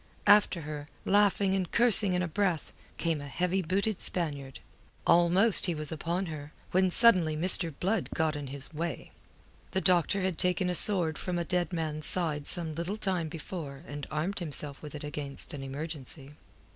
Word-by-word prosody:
After 205 -4 +4
her, 150 -1 -7 0.2
laughing 200 -1 +2
and 185 -3 -2
cursing 225 -5 +5
in 180 - 0
a - - -2
breath, 180 -1 -2 0.3
came 165 -3 -2
a 145 - -8
heavy 180 +5 -1
booted 195 +4 -1
Spaniard. 145 -6 -3 0.5
Almost 180 +6 +5
he 175 - -1
was 150 -1 -4
upon 170 +4 -3
her, 150 -3 -8 0.2
when 185 +1 +2
suddenly 180 -7 +5
Mr. 170 0 +2
Blood 195 +1 -1
got 160 -2 0
in 145 -1 -6
his 140 +3 -5
way. 160 -3 -5 0.6
The 190 - +1
doctor 185 +2 +2
had 185 -3 -2
taken 180 0 +2
a - - -1
sword 175 -4 +3
from 180 -1 -3
a 170 - -2
dead 180 0 -1
man's 155 -3 -3
side 155 -5 -2
some 165 -3 +3
little 170 +6 -4
time 185 -6 -1
before 155 -3 -8
and 145 0 -7
armed 160 +7 -3
himself 150 -4 -2
with 150 0 -9
it 150 - -7
against 145 -1 0
an 145 - -6
emergency. 140 0 -4
170 Hz, 175 wpm, -29 LUFS, 150-185 Hz, 0.6 s, cursing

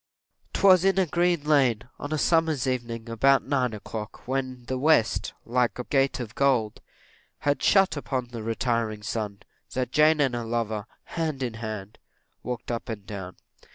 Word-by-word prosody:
'Twas 185 -3 +6
in 195 0 +3
a 190 - +4
green 175 -1 +1
lane, 135 -7 +3 0.2
on 145 - -5
a 155 - +1
summer's 160 -4 +2
evening, 120 -3 -3
about 135 +4 +3
nine 130 -3 +1
o'clock, 110 +2 -7
when 130 -2 -3
the 130 0 -3
west, 145 -6 +2
like 120 -2 +1
a 125 - -3
gate 135 +1 +1
of 115 -3 -6
gold, 125 -6 +1 0.6
had 145 0 +1
shut 195 -3 +4
upon 130 -4 -3
the 120 -2 -6
retiring 115 -1 -1
sun, 105 -1 -3 0.4
that 125 -1 -1
Jane 155 +2 +5
and 135 -4 +2
her 120 -1 -2
lover, 115 -2 -2 0.2
hand 155 -5 -3
in 120 -3 -2
hand, 110 -2 -6 0.4
walked 125 -1 -5
up 120 +1 -4
and 105 -3 -5
down. 95 -3 -7
125 Hz, 165 wpm, -26 LUFS, 115-145 Hz, 0.6 s, Twas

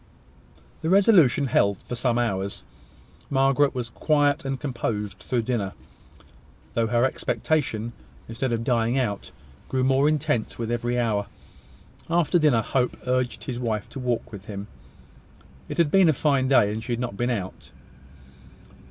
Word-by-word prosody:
The 160 - -1
resolution 185 - +5
held 100 -6 +2
for - - -7
some 120 0 0
hours. 100 -5 -2 0.7
Margaret 135 0 +3
was 120 -2 -3
quiet 145 0 +2
and 135 -1 -2
composed 105 -7 -3
through 120 +3 -1
dinner, 110 -5 -2 1.0
though 115 - +1
her 120 +2 +2
expectation, 130 -5 -1 0.3
instead 120 +3 -2
of 115 -1 -1
dying 120 0 +1
out, 105 -6 -2 0.4
grew 130 -1 0
more 135 +3 +3
intense 135 -7 -1
with 115 0 -3
every 120 +1 -1
hour. 105 -4 0 0.8
After 170 +1 +2
dinner, 140 -8 +3
Hope 125 +3 0
urged 125 -1 -1
his 125 -3 -4
wife 110 -4 -2
to - - -8
walk 125 -1 -2
with 100 -2 -9
him. 100 -1 -6 1.0
It - - -5
had 165 -4 +3
been 190 -3 +5
a - - +4
fine 135 -2 +1
day, 120 -6 +4
and 110 +1 -5
she 120 - -3
had 120 - -2
not 120 -5 -3
been 120 +4 -1
out. 100 -6 -4
125 Hz, 150 wpm, -25 LUFS, 115-135 Hz, 1.0 s, resolution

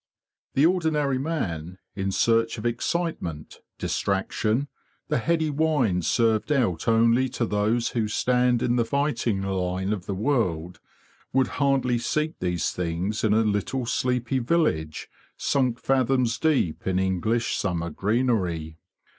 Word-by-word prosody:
The 140 - +5
ordinary 155 -6 +1
man, 90 - -3 0.2
in 95 0 -2
search 115 +3 +2
of 110 - -7
excitement, 120 - -2 0.2
distraction, 110 +6 -1 0.4
the - - +1
heady 160 +3 +1
wine 140 - +1
served 110 - +1
out 115 - +1
only 115 +3 +4
to 120 - -1
those 110 +3 +1
who 115 -3 -1
stand 125 +2 +2
in 120 0 +1
the 120 - +3
fighting 120 -5 0
line 95 +1 -1
of 95 -4 -6
the 100 - -2
world, 90 - -1 0.5
would 130 0 +2
hardly 135 -3 +2
seek 155 +6 -2
these 90 -2 -1
things 90 +5 -2
in 110 - +3
a 110 - +4
little 110 +5 -1
sleepy 125 +2 0
village 115 - 0 0.3
sunk 130 -4 +1
fathoms 130 -2 +1
deep 135 - 0
in 95 -1 +1
English 95 +5 0
summer 85 -3 -2
greenery. 95 -7 -1
115 Hz, 130 wpm, -25 LUFS, 95-130 Hz, 0.5 s, The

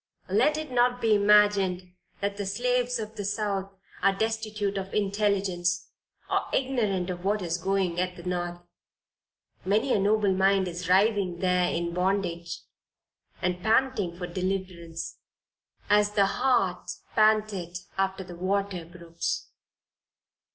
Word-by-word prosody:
Let 305 0 +3
it 310 -3 -5
not 245 0 +3
be 225 -2 +3
imagined 200 -3 +3 0.3
that 200 0 -1
the 205 - -3
slaves 245 +4 0
of 220 -1 -6
the 205 - -3
South 200 -1 -1 0.3
are 195 - +5
destitute 215 -2 -1
of 195 -1 -4
intelligence, 195 -4 0 0.4
or - - +1
ignorant 210 -9 0
of 175 0 -6
what 205 0 0
is 170 0 -2
doing 185 -1 0
at 180 0 -1
the 175 - -11
North; 175 -1 -3 1.0
many 215 +7 +2
a - - +3
noble 205 0 +3
mind 190 0 +3
is 175 0 -5
writhing 195 -2 +3
there 180 0 +2
in 170 0 -2
bondage, 180 -2 -1 0.8
and 180 0 0
panting 220 -5 +1
for 180 - -4
deliverance, 180 -2 -4 0.7
as 210 0 +3
the 200 -2 +4
hart 195 -3 +1 0.3
panteth 210 -5 +1
after 190 0 -1
the 175 -1 -10
water 190 -1 -1
brooks. 170 -1 -4
195 Hz, 130 wpm, -27 LUFS, 180-210 Hz, 1.0 s, are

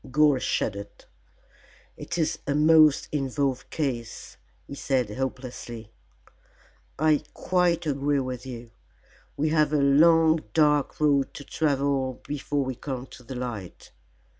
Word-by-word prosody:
Gore 145 0 +4
shuddered. 100 -4 -3 0.9
"It 170 - -6
is 160 -2 0
a 140 - 0
most 155 -1 +5
involved 135 -2 -2
case," 125 -7 -4 0.3
he - - -10
said 130 -5 -1
hopelessly. 125 -4 -6 1.1
"I 155 0 +3
quite 175 -2 +1
agree 145 -1 0
with 130 -1 -4
you. 120 -3 -9 0.7
We 155 +2 +1
have 155 -1 +2
a 150 - +2
long 160 +3 +5
dark 150 -2 +2
road 145 -3 +2
to 145 - -8
travel 140 -4 -1
before 145 -1 -2
we 130 - -3
come 130 0 -6
to - - -12
the 125 +2 -9
light. 120 -7 -7
140 Hz, 125 wpm, -26 LUFS, 130-150 Hz, 1.1 s, most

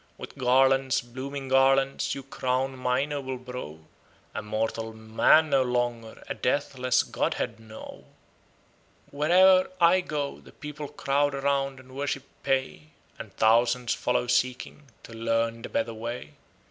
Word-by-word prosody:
With - - -9
garlands, 130 +1 +3
blooming 135 +3 -7
garlands 135 +1 +3
you 135 - -7
crown 130 0 -2
my 130 +1 0
noble 140 -3 -4
brow, 125 - -8 0.6
A 110 - -3
mortal 110 +1 -3
man 110 +8 +3
no 135 -1 +4
longer, 120 -2 -2
a - - -2
deathless 130 -2 0
godhead - - -2
now. 110 -1 -11 1.1
Where 150 +2 -2
e'er 185 +1 +6
I 175 +2 +5
go, 145 -5 -4
the - - -17
people 150 0 -7
crowd 140 +1 0
round 135 -1 -1
and 130 0 -15
worship 140 -1 -2 0.2
pay, 130 - -1 0.3
And - - -8
thousands 120 +2 +3
follow 125 0 0
seeking 125 +4 -1 0.2
to 115 - -11
learn 115 0 -1
the - - -7
better 115 0 -1
way. 115 -8 -6
130 Hz, 135 wpm, -27 LUFS, 115-140 Hz, 1.1 s, e'er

